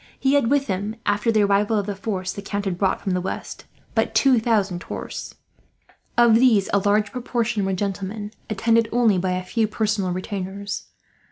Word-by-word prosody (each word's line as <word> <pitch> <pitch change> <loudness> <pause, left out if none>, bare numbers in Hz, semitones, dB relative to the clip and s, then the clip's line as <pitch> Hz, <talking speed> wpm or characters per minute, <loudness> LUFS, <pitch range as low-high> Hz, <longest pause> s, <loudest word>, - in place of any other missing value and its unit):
He 270 0 +2
had 280 -5 +3
with 280 0 +2
him, 205 +1 -3
after 205 +3 +2
the 215 -2 +3
arrival 205 +2 +2
of 205 - 0
the 205 -1 -3
force 190 -2 -3
the 200 - -6
Count 200 0 -3
had 190 -2 -1
brought 190 -2 +1
from 195 - -2
the 180 - 0
west, 190 - -6 0.3
but - - 0
two 265 -3 +5
thousand 205 -6 0
horse. - - -7 0.8
Of 240 -1 +6
these 225 -4 +4
a 200 - +5
large 205 +1 +1
proportion 235 -4 -1
were 195 - 0
gentlemen, 200 +2 -3 0.2
attended 225 +2 +2
only 225 -5 +3
by 185 0 0
a 185 0 -2
few 220 +4 0
personal 215 -3 -1
retainers. 195 +2 -4
205 Hz, 185 wpm, -23 LUFS, 195-225 Hz, 0.8 s, Of